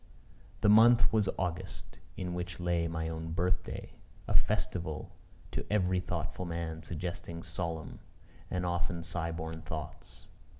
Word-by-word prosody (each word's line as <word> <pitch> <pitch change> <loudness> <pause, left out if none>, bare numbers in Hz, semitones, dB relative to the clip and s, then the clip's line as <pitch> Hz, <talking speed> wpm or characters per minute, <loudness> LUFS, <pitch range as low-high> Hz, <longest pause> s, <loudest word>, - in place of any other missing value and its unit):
The - - +5
month 115 +1 +8
was 105 -3 +4
August, 90 +1 -3 0.2
in 90 -1 -2
which 90 -1 -4
lay 85 -1 +2
my 80 -1 -2
own 80 0 -3
birth 90 +2 +2
day; - - -6 0.4
a - - 0
festival 80 -4 +1 0.4
to - - -2
every 95 -3 +3
thoughtful 90 0 -2
man 85 -1 -3
suggesting 85 +1 -4
solemn 85 -1 -3 0.5
and 90 -1 0
often 85 -1 0
sigh 85 -1 -1
born 80 0 -4
thoughts. 80 -1 -7
85 Hz, 135 wpm, -32 LUFS, 80-90 Hz, 0.5 s, month